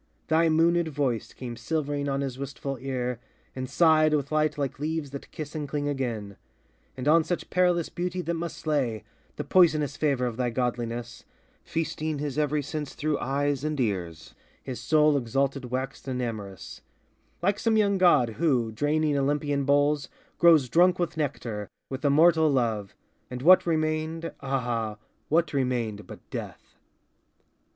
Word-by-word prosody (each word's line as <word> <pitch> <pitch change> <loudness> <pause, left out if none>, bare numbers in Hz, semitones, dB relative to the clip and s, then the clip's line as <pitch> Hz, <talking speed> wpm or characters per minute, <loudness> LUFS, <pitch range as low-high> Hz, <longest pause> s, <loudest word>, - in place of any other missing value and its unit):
Thy 160 +1 +4
moonéd 165 +1 +3
voice 140 -6 -2
Came 120 -2 -7
silvering 145 -1 -2
on 135 0 -1
his 135 -2 -4
wistful 140 0 -4
ear, 125 -2 -3 0.4
and 130 -1 -4
sighed 155 0 +4
With 140 -1 -2
light 155 -1 +1
like 140 -3 -3
leaves 155 -1 -3
that 140 - -8
kiss 155 -1 -7
and 150 -3 -4
cling 145 0 -2
again. 115 -8 -3 0.6
And 130 +2 -4
on 160 +2 +5
such 175 +2 -4
perilous 180 -2 +2
beauty 180 +1 -3
that 170 - -2
must 165 -1 -4
slay, 135 -8 -1 0.3
The - - -4
poisonous 155 -6 +3
favor 140 -5 +1
of 120 -2 -3
thy 125 -1 0
godliness, 120 -1 -3 0.4
Feasting 155 -1 -2
his 145 0 -3
every 150 0 +1
sense 150 0 -5
through 150 -1 -1
eyes 140 +1 -1
and 155 -1 -2
ears, 90 -8 -3 0.3
His 130 -2 -6
soul 150 -1 +4
exalted 135 +2 -1
waxed 130 +3 -4
and 130 -1 -2
amorous, 105 -6 -6 0.6
Like 200 +3 +2
some 225 -1 +2
young 200 -2 +2
god 150 -10 +5
who, 125 -9 +2
draining 150 +5 +1
Olympian 145 0 0
bowls, 145 +1 +2 0.3
Grows 165 -6 +6
drunk 175 +7 +4
with 175 -2 -2
nectar, 120 -9 -3 0.2
with 130 +2 -5
immortal 160 +2 +5
love; 115 -7 0 0.3
And 125 0 -6
what 180 +2 +7
remained, 155 0 -1
ah, 120 -5 -2 0.3
what 165 0 +2
remained 120 -6 -1
but - - -12
death! - - -7
145 Hz, 155 wpm, -27 LUFS, 125-155 Hz, 0.6 s, what